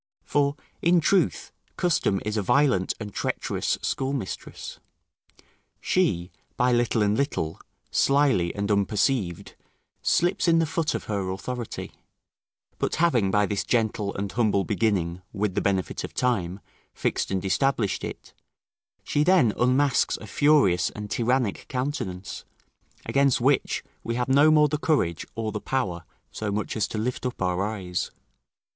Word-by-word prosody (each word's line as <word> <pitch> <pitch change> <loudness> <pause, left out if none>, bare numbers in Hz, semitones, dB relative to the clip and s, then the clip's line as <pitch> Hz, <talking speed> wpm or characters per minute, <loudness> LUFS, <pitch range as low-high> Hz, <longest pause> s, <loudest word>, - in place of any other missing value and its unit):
For, 140 0 +1 0.3
in 175 +1 +4
truth, 180 +3 +1 0.3
custom 165 - +1
is 105 0 -2
a 105 - +1
violent 125 -3 +2
and 105 -3 -7
treacherous - - -1
schoolmistress. 135 -6 -4 1.0
She, 90 - 0 0.3
by 125 +1 +3
little 120 -2 +2
and 105 0 +2
little, 95 - -1 0.3
slily 135 -12 +3
and 100 +1 -1
unperceived, 100 -1 0 0.5
slips 175 +1 +2
in 165 -1 +5
the 165 - +3
foot 160 +1 -1
of - - -3
her 100 -3 -2
authority, 120 +5 -5 0.9
but - - 0
having 130 - +2
by 105 +1 +3
this 100 -1 -1
gentle 110 -4 0
and 100 0 -3
humble 105 -4 +2
beginning, 95 -5 0
with 105 -2 -1
the 100 - 0
benefit 95 -2 -1
of - - -7
time, 100 -7 0 0.3
fixed - - -1
and 95 0 -2
established 115 0 +1
it, - - -7 0.7
she 145 - +1
then 155 - +4
unmasks 130 +2 +2
a - - -10
furious 140 -7 +3
and 105 -1 -8
tyrannic 120 -2 0
countenance, 125 - -4 0.6
against 140 -2 +3
which 135 +3 +1 0.2
we 115 - -2
have 125 0 -1
no 145 +3 +6
more 150 -1 +5
the 150 +1 -2
courage 145 - 0
or 110 -1 -2
the 105 0 -4
power 90 -11 -2 0.3
so 110 -2 -3
much 105 0 -2
as 110 - 0
to - - -5
lift 120 +4 -2
up 125 -1 -3
our 90 0 0
eyes. 95 -4 -3
110 Hz, 145 wpm, -25 LUFS, 100-140 Hz, 1.0 s, no